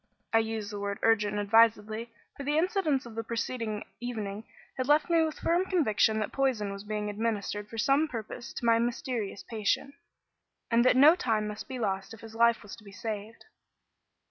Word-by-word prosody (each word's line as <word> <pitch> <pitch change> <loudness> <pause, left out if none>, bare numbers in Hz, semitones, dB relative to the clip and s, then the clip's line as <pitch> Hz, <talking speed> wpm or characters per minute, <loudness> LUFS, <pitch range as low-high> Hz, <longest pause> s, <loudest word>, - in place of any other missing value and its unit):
I 225 - +6
use 220 -2 -3
the 205 - -5
word 200 0 -3
"urgent" 210 -2 +3
advisedly; 220 +1 +3 0.2
for - - -8
the 295 +2 0
incidents 325 - +1
of 235 - -9
the 225 +1 -4
preceding 230 -2 -3 0.2
evening 220 -3 -5 0.3
had 255 0 -2
left 300 +4 +3
me 335 -1 +5
with 315 -1 -2
the - - -15
firm 345 +2 +2
conviction 220 - +2
that 215 -1 -2
poison 245 -7 0
was 200 0 -8
being 210 0 -3
administered 210 -1 -2
for 225 - -8
some 275 +7 +3
purpose 235 -2 -7
to - - -5
my 230 0 +5
mysterious 235 -3 -2
patient, 225 +5 -1 0.8
and 230 +1 +5
that 255 - +5
no 300 +5 +8
time 220 -9 0
must 210 +1 -6
be 260 - -5
lost 195 -2 -2
if 220 - -17
his 225 -1 -11
life 235 0 +3
was 205 - -9
to 220 - -16
be 200 - -12
saved. 220 0 -6
225 Hz, 195 wpm, -29 LUFS, 210-255 Hz, 0.8 s, no